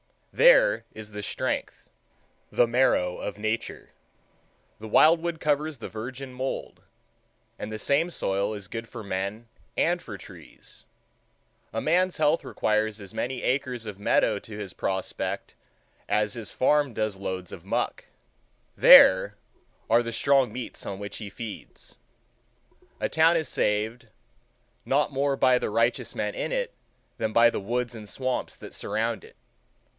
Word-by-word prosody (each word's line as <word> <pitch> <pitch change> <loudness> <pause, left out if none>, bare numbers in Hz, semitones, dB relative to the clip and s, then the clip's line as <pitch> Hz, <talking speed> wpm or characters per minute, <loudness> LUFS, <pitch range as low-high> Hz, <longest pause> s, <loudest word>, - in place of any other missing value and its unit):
There - - +5
is 110 -1 -9
the 105 0 -6
strength, - - -3 0.6
the 120 - +4
marrow, 115 -7 +2
of 105 - -5
Nature. 110 +2 -3 0.9
The 110 - -8
wild 160 +9 +5
wood 170 -1 -3
covers 150 0 0
the 115 - -7
virgin 130 +4 -7
mould,—and 125 -4 -8
the 110 - -4
same 145 +9 +1
soil 100 - -1
is 100 -2 -8
good 115 +1 -5
for 110 - -8
men 100 +4 -4 0.3
and - - +2
for - - -8
trees. - - -14 0.9
A 110 - -2
man's 180 +3 +2
health 155 +1 +2
requires 110 0 0
as 100 -2 -9
many 125 0 -3
acres 125 -3 -1
of 105 -2 -7
meadow 100 - +2
to 105 -2 -10
his 100 -3 -6
prospect 95 -1 -3 0.6
as 105 -1 +1
his 115 -3 -6
farm 145 -1 +2
does 110 -2 -1
loads 95 -2 -5
of - - -10
muck. - - -2 0.7
There 95 +3 +8 0.5
are 115 +1 +5
the 115 -1 -5
strong 135 +1 +3
meats 125 -1 -6
on 100 - -4
which 100 0 -7
he 105 -3 -7
feeds. 110 0 -9 1.0
A - - -1
town 165 +1 +4
is 160 - -2
saved, 110 +3 -1 0.8
not 145 +3 +2
more 140 0 +1
by 130 -2 +4
the - - -2
righteous 115 +3 0
men - - -2
in - - -3
it - - -2 0.4
than 110 -1 -2
by 115 +1 +6
the - - -3
woods 120 +4 -2
and 110 -3 -10
swamps 130 +2 -3
that - - -11
surround - - -2
it. - - -16
115 Hz, 150 wpm, -26 LUFS, 105-140 Hz, 1.0 s, There